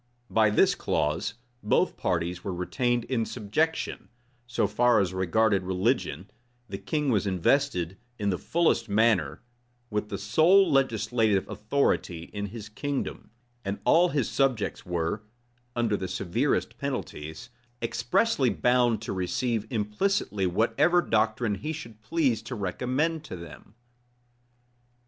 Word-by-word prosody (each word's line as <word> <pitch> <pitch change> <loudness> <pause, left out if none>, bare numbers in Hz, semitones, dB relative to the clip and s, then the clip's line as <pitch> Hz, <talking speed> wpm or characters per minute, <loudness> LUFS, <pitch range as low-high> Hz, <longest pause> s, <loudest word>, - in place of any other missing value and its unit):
By 110 -1 +4
this 105 - +4
clause, 75 +9 -1 0.3
both 105 - +2
parties 85 +1 -2
were 95 -4 -3
retained 120 +7 0
in 120 -2 -1
subjection: 130 +10 -2 0.4
so 120 - +1
far 120 -2 +3
as 95 -2 0
regarded 95 +3 +2
religion, 90 -2 -1 0.4
the 95 -3 -6
king 135 +8 -1
was 105 -3 +1
invested, 95 - +1 0.2
in 100 -2 0
the 90 - -2
fullest 165 -9 +1
manner, 100 -9 +2 0.5
with 105 0 -2
the 100 - -3
sole 160 - +4
legislative 115 -6 +2
authority 105 -8 -1
in 100 0 -3
his 105 +1 -8
kingdom; 140 +6 -4 0.3
and 100 +1 -3
all 175 +2 +5
his 140 -6 0
subjects 130 -6 0
were, 85 +3 -1 0.5
under 115 -3 +1
the 95 - -3
severest 95 +9 -1
penalties, 115 - -5 0.3
expressly 125 - +1
bound 120 0 +2
to - - -3
receive 110 +5 -1
implicitly 105 - 0
whatever 145 - +3
doctrine 110 0 +1
he 105 +11 -4
should 115 -9 -8
please 125 -2 +1
to 120 +3 -6
recommend 130 - -1
to 120 - -7
them. 85 +4 -12
110 Hz, 125 wpm, -27 LUFS, 95-130 Hz, 0.5 s, all